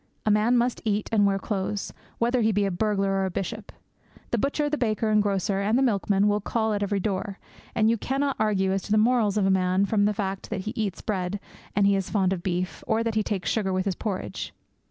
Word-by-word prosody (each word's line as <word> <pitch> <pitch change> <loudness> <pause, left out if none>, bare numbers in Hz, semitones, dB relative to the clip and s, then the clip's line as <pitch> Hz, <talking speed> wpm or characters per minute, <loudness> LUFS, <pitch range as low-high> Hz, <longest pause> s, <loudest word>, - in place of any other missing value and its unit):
A 215 - +3
man 215 +4 +3
must 240 +1 0
eat 210 -1 -1
and 205 -2 +4
wear 195 0 +1
clothes, 195 0 -3 0.2
whether 240 +1 +1
he 220 0 +3
be 205 0 +1
a 195 - 0
burglar 195 +1 0
or 195 0 +1
a - - -1
bishop. 205 +3 -5 0.6
The 235 - +1
butcher, 285 +4 0
the 295 - 0
baker, 220 -4 0
the 210 - +5
grocer, 195 -1 0
and 215 +4 +2
the 270 - +3
milkman 200 -4 +2
will 205 0 +1
call 220 +1 0
at 205 - -1
every 205 0 0
door; 195 0 -2 0.4
and 220 -1 +3
you 230 +1 +3
cannot 275 +3 -1
argue 200 -3 +2
as 195 0 0
to 210 - -8
the 215 - +4
morals 215 -2 +3
of 200 - +2
a 195 - +3
man 185 +1 +2
from 205 0 +2
the 210 - +2
fact 195 -1 -3
that 190 - -3
he 215 - -5
eats 210 -4 -3
bread, 195 -1 -2 0.4
that 200 0 +4
he 200 0 +4
is 195 -2 -2
fond 190 -3 +2
of 180 - -4
beef, 180 0 -3
or 225 0 +2
that 230 -1 -1
he 215 - +2
takes 200 -3 -2
sugar 205 -4 0
with 185 +1 0
his 195 - 0
porridge. 195 +1 -4
205 Hz, 245 wpm, -26 LUFS, 195-220 Hz, 0.6 s, the